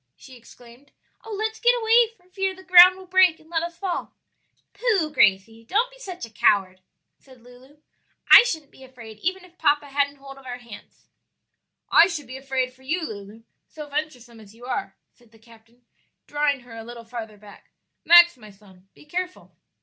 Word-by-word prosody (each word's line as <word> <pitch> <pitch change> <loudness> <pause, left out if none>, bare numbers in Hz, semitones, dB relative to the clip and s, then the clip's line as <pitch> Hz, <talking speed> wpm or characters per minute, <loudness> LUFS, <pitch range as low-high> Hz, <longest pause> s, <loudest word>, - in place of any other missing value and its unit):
she 260 - -16
exclaimed. 240 +3 -18 0.3
"Oh, 445 - -11
let's 440 +1 -4
get 485 0 +3
away, 455 +1 +4
for 360 -1 -30
fear 385 0 -3
the 375 - -15
ground 365 0 +8
will 380 - -13
break 370 -3 +3
and 315 +1 -22
let 325 -1 0
us 340 0 -6
fall." 370 -1 -5 0.6
"Pooh! 400 -11 0
Gracie, 220 +1 +1
don't 445 - -1
be - - -19
such 370 - -8
a 230 - -17
coward," 190 -3 +1 0.4
said 260 -2 -20
Lulu. 250 +4 -19 0.5
"I - - +12
shouldn't 315 -9 -5
be 265 - -17
afraid 230 -5 -13
even 370 - -3
if 360 0 -23
papa 290 -2 +1
hadn't 285 0 -1
hold 275 -1 -13
of 270 - -19
our 245 0 -6
hands." 235 -3 -15 0.8
"I 340 - +7
should 325 -6 -6
be 255 +2 -10
afraid 265 -1 -3
for 260 - -25
you, 315 +6 -3
Lulu, 210 +1 -11 0.2
so 300 -1 -10
venturesome 270 -6 -6
as 215 0 -17
you 240 +2 -14
are," 245 -6 -5 0.2
said 240 -3 -27
the 225 - -21
captain, 230 +1 -22 0.4
drawing 290 -2 -1
her 240 -1 -14
a 225 - -9
little 235 0 -11
farther 225 -2 -9
back. 205 0 -17 0.3
"Max, 345 -1 +7
my 215 -3 -14
son, 195 -2 -21
be - - -19
careful." 360 +4 -6
275 Hz, 190 wpm, -23 LUFS, 230-355 Hz, 0.8 s, I